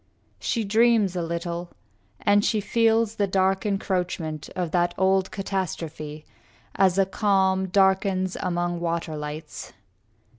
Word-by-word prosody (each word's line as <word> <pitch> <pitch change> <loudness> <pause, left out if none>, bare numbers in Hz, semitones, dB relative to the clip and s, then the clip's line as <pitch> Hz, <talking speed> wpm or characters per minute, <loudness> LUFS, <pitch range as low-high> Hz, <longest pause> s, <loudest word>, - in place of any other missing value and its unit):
She 230 - -1
dreams 220 -2 +3
a 175 - -1
little, 170 +1 -4 0.5
and 205 0 +4
she 215 - +1
feels 225 +1 +2
the 200 - +1
dark 190 +2 +1
Encroachment 180 -6 -2
of 175 -3 -2
that 175 0 +1
old 190 0 +2
catastrophe, 165 -6 -4 0.5
As 190 -1 +3
a 195 - +4
calm 190 -1 +1
darkens 190 0 +2
among 175 -1 -1
water 170 -2 -2
lights. 150 +1 -7
190 Hz, 120 wpm, -25 LUFS, 175-200 Hz, 0.5 s, and